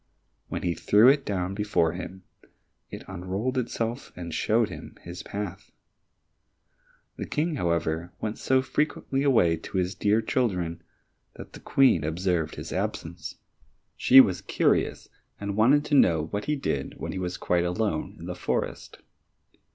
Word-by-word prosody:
When - - -4
he 90 -1 +1
threw 105 +9 +5
it 140 0 +3
down 95 -2 -1
before 100 -5 +1
him, 95 +1 -7 0.7
it - - -8
unrolled 95 +7 -3
itself 120 0 -3
and 85 -2 -6
showed 110 +5 +2
him - - -10
his 85 +1 -7
path. 100 -2 -6 1.5
The - - -5
King, 160 +3 -1
however, 85 -2 -1
went 110 0 -4
so 130 0 +2
frequently 135 -1 -1
away 110 - +3
to 85 - -6
his 90 +1 0
dear 105 +3 +2
children 90 -9 -1 0.5
that - - -11
the - - -10
Queen 130 - +3
observed 80 0 -1
his - - -7
absence; 80 0 -4 0.6
she 130 - +7
was 95 -9 +5
curious - - +1 0.3
and 100 -1 -3
wanted 135 +7 +4
to 150 - -4
know 85 - +5
what 105 0 -3
he 150 +1 0
did 70 - -3
when - - -4
he 95 - -4
was 90 0 -3
quite 90 -1 +1
alone 90 -2 -1
in - - -10
the - - -4
forest. - - -4
95 Hz, 150 wpm, -26 LUFS, 85-120 Hz, 1.5 s, she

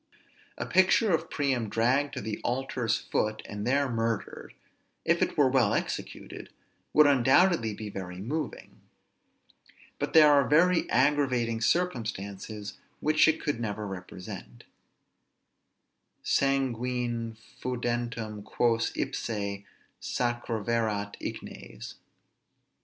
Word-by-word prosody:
A - - -3
picture 190 +2 +4
of 160 0 0
Priam 130 -6 0
dragged 130 +7 +1
to - - -3
the 105 +1 -4
altar's 120 -3 0
foot, 110 0 -2
and 105 +1 -5
there 140 +2 +2
murdered, 115 -3 -3 0.5
if - - +2
it - - 0
were 145 - +5
well 130 -5 +3
executed, - - -5 0.4
would 150 - +6
undoubtedly 135 - +4
be 110 - -6
very 90 -2 -6
moving; 150 +10 -5 1.2
but - - -2
there 150 -2 +8
are 140 -2 +4
very 170 +4 +4
aggravating 125 -4 +2
circumstances, 110 - -2 0.2
which 155 +1 +4
it 160 0 +2
could 145 -6 -1
never 105 -2 -3
represent: 90 -9 -8 1.6
Sanguine 125 -4 0 0.2
foedantem 120 -3 -3
quos 115 +1 +1
ipse 100 -3 -3 0.4
sacraverat 115 -3 -1
ignes. - - -7
120 Hz, 100 wpm, -28 LUFS, 110-140 Hz, 1.6 s, there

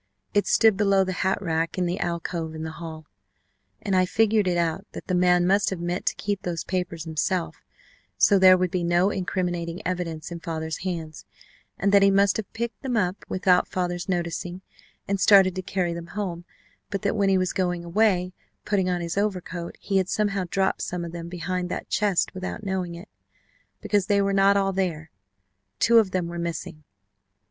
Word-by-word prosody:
It 205 - +2
stood 220 -3 +4
below 195 -2 +3
the 185 0 -3
hat 190 +1 +1
rack 165 0 -1
in 180 - +1
the 175 +2 -2
alcove 170 -2 -3
in 160 - -5
the 160 - -4
hall, 160 -1 -8 0.8
and 200 -3 0
I 185 0 +3
figured 220 -1 +2
it 175 -1 +1
out 170 +4 -1
that - - -8
the 185 - -2
man 180 0 +4
must 200 +3 +3
have 190 - -4
meant 175 +2 -3
to - - +2
keep 205 -1 -3
those 170 -3 -3
papers 180 -3 -3
himself, 165 +2 -2 0.6
so 200 -2 +5
there 185 0 +8
would 180 -1 0
be 180 -2 -1
no 175 +3 +3
incriminating 175 -3 -2
evidence 175 -3 -3
in 170 - -5
father's 160 -1 -4
hands, 165 -5 -5 0.5
and 200 +1 +1
that 200 0 +6
he 195 - +6
must 195 0 +3
have 220 - -5
picked 235 +1 -4
them 255 -4 -1
up 185 -2 -1
without 185 -1 +3
father's 175 0 -3
noticing 175 0 -3 0.5
and 200 0 0
started 190 -1 +6
to 185 - -2
carry 180 -2 -1
them 170 0 -7
home; 175 -4 -3 0.4
but 200 -2 -4
that 200 - +1
when 200 -2 +2
he 190 - +4
was 185 -1 0
going 175 -2 -1
away, 180 -1 +2 0.3
putting 190 -3 +1
on 180 -1 -1
his 170 +3 -2
overcoat, 180 -4 -3
he 195 -1 -1
had 190 -1 +1
somehow 200 -3 0
dropped 190 +1 0
some 175 -1 -3
of 170 - -7
them 170 0 -7
behind 180 +1 -3
that - - -5
chest 205 -4 +1
without 185 +3 -5
knowing 185 -3 -3
it. 175 +5 -10 0.7
Because 205 -3 +1
they 205 -1 +3
were 200 0 +1
not 195 +1 +4
all 195 -1 +1
there 165 -5 -2 0.7
two 230 - +5
of 215 -4 +2
them 185 -2 -1
were 170 0 -5
missing. 165 -2 -5
185 Hz, 195 wpm, -25 LUFS, 170-195 Hz, 0.8 s, there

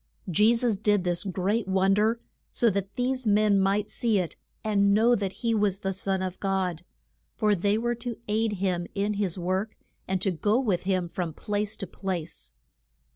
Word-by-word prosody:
Je 210 +7 +4
sus 230 -3 +1
did 205 -1 +2
this 175 0 -1
great 195 +3 -1
won 190 0 +3
der 220 +3 +2 0.3
so 235 -2 +2
that 200 0 -3
these 255 -1 0
men 210 -1 +4
might 195 +2 +1
see 230 -3 +1
it 180 -4 -2 0.3
and 200 -2 +3
know 230 +3 +4
that 200 -5 0
he 230 - +3
was 205 -2 +1
the 195 0 -1
Son 190 0 -1
of 185 -1 -4
God; 185 -4 -1 0.5
for 210 -2 +2
they 200 +2 +1
were 240 +1 0
to 235 -1 -5
aid 215 +1 +1
him 180 -3 -1
in 205 +1 0
his 200 -3 -1
work, 185 +4 -2 0.3
and 190 0 0
to 195 +1 +1
go 205 +7 +1
with 205 -9 0
him 185 -2 +1
from 170 -2 -4
place 210 0 -2
to 195 - -4
place. 170 - -5
200 Hz, 185 wpm, -27 LUFS, 185-215 Hz, 0.5 s, Je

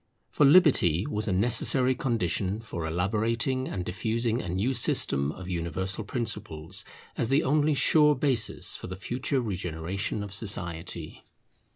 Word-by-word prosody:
For 145 - +4
liberty 135 - +4
was 105 +1 -2
a - - 0
necessary 120 +6 +2
condition 105 -5 -1
for 85 -7 -5
elaborating 115 +9 -1
and 90 -2 -4
diffusing 115 +5 -1
a 90 - -6
new 100 +9 0
system 70 - +2
of 90 +3 -9
universal 95 +3 -3
principles, 105 -5 -3 0.3
as 115 - -1
the 140 +4 +3
only 150 +2 +2
sure 150 +1 +5
basis 130 -5 0
for - - -7
the 90 - -6
future 130 +7 -2
regeneration 95 0 -4
of 100 -2 -8
society. 85 -6 -4
105 Hz, 140 wpm, -27 LUFS, 90-125 Hz, 0.3 s, sure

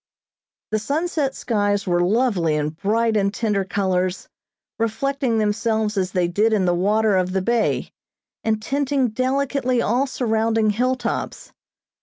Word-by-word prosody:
The 215 - +1
sunset 290 +2 -1
skies 205 -3 0
were 175 -2 +1
lovely 185 -5 +1
in 150 0 0
bright 220 +7 0
and 200 -1 +2
tender 205 -2 0
colors, 185 -1 -1 0.5
reflecting 230 +2 0
themselves 220 0 0
as 185 -2 -1
they 180 -2 +1
did 210 +6 +1
in 200 -3 +2
the 175 - +2
water 210 +4 +2
of 185 0 0
the 190 - +1
bay, 235 +2 0 0.5
and 220 -1 +1
tinting 275 +2 0
delicately 255 +1 0
all 245 +5 +1
surrounding 225 -3 +1
hilltops. 245 +2 -2
220 Hz, 135 wpm, -22 LUFS, 195-245 Hz, 0.5 s, and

